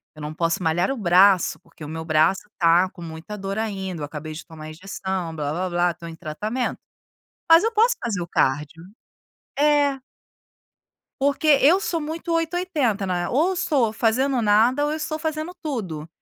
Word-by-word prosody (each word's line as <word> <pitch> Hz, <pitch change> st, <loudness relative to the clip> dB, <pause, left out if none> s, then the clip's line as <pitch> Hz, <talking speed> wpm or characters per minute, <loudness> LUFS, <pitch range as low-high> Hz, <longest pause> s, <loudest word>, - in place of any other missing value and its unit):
Eu 155 Hz, -, -11 dB
não 150 Hz, +1 st, -5 dB
posso 165 Hz, +2 st, -1 dB
malhar 175 Hz, +7 st, +1 dB
o 270 Hz, -, -3 dB
braço, 185 Hz, -1 st, +4 dB
porque 165 Hz, -1 st, -15 dB
o -, -, -6 dB
meu 160 Hz, +1 st, -6 dB
braço 160 Hz, +6 st, +2 dB
está 175 Hz, +1 st, +4 dB
com 175 Hz, -, -13 dB
muita 165 Hz, +5 st, -8 dB
dor 195 Hz, 0 st, -5 dB
ainda. 190 Hz, -6 st, -3 dB
Eu -, -, -2 dB
acabei 155 Hz, +1 st, -7 dB
de 155 Hz, -, -9 dB
tomar 155 Hz, -1 st, -10 dB
injeção, 185 Hz, 0 st, -5 dB
"blá-blá-blá.", 175 Hz, +4 st, 0 dB
estou 170 Hz, 0 st, -10 dB
em 165 Hz, -, -9 dB
tratamento. 210 Hz, +12 st, -3 dB, 0.7 s
Mas 330 Hz, +4 st, +8 dB
eu 455 Hz, -, +1 dB
posso 460 Hz, +3 st, +4 dB
fazer 210 Hz, -7 st, -2 dB
o 170 Hz, -, -5 dB
cardio." 150 Hz, +5 st, -1 dB, 0.7 s
É. 290 Hz, -2 st, +3 dB, 1.2 s
Porque 285 Hz, +2 st, +1 dB
eu 345 Hz, +8 st, +5 dB
sou 335 Hz, -4 st, -2 dB
muito 320 Hz, +2 st, -4 dB
8 330 Hz, +1 st, 0 dB
ou -, -, +1 dB
80, 255 Hz, -, 0 dB
né. 175 Hz, -1 st, -1 dB
Ou 305 Hz, +8 st, +2 dB
eu 380 Hz, -, -1 dB
estou 265 Hz, -10 st, +1 dB
fazendo 245 Hz, +4 st, +1 dB
nada 230 Hz, +7 st, +3 dB
ou 295 Hz, -, 0 dB
eu -, -, -2 dB
estou 310 Hz, 0 st, -4 dB
fazendo 315 Hz, +2 st, -3 dB
tudo. 185 Hz, -, -4 dB
195 Hz, 180 wpm, -23 LUFS, -, 1.2 s, Mas